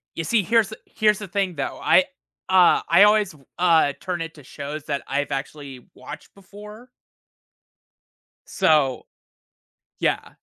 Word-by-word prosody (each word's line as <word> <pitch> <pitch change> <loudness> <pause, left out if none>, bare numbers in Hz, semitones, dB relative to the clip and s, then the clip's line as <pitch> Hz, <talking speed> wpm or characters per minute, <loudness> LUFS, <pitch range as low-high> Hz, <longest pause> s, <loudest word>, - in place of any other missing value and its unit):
You 165 - -3
see, 215 +3 +1
here's 225 +1 +2
the 220 - -10
here's 210 -2 +1
the 205 - -7
thing, 190 -2 -2
though. 140 - -5
I, - - +4 0.4
uh, 185 -2 +5
I - - +6
always, 210 -4 +3 0.2
uh, 165 -5 +3
turn 180 -2 -4
it 165 0 -7
to 145 - -15
shows 145 +3 -8
that 140 -2 -3
I've 140 +1 -2
actually 135 -2 -7
watched 150 0 -11
before. 210 +4 -14 1.6
So 150 -9 +1 0.9
yeah, - - -1
175 Hz, 140 wpm, -22 LUFS, 145-205 Hz, 1.6 s, I